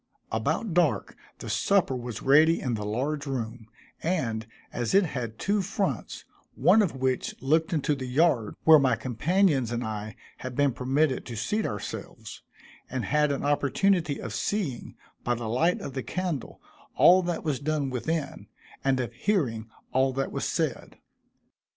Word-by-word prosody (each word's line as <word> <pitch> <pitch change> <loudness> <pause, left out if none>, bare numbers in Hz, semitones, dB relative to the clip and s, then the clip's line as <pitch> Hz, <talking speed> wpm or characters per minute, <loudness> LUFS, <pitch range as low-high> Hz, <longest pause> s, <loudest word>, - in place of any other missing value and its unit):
About 215 -7 -1
dark 155 - +1 0.2
the - - -9
supper 130 - +2
was 120 -3 -6
ready 155 +5 +5
in 125 - -2
the 105 -2 -3
large 140 +8 -2
room, 115 -4 -4 0.3
and, 115 -11 -1 0.3
as 120 +7 -1
it 200 -1 +6
had 120 -7 -5
two 205 0 +1
fronts, 200 +1 -3 0.3
one 220 - +5
of 185 -9 0
which 130 -1 -1
looked 160 +6 +1
into 150 -2 +1
the 130 -2 -4
yard 130 -5 +2
where 160 -1 +8
my 130 -4 +3
companions 135 - +1
and 120 +1 -2
I 110 -1 -5 0.2
had 130 -1 -7
been 145 -1 +2
permitted 130 +3 +1
to 120 - -6
seat 205 - -1
ourselves, 105 -2 -7 0.5
and 130 -2 -3
had 150 0 +2
an 140 - -2
opportunity 145 +3 +1
of 115 - -6
seeing, 175 - -2 0.3
by 120 - +1
the 115 -1 -5
light 160 +11 +1
of 135 - -6
the 130 - -3
candle, 180 -3 -4 0.4
all 185 +2 +7
that 175 -2 -3
was 150 -5 -1
done 145 -2 -1
within, 145 +3 -3 0.4
and 135 -1 +2
of 120 -2 -3
hearing 120 - -1 0.2
all 130 0 +2
that 135 +1 -2
was - - -3
said. - - -2
135 Hz, 160 wpm, -27 LUFS, 120-160 Hz, 0.5 s, where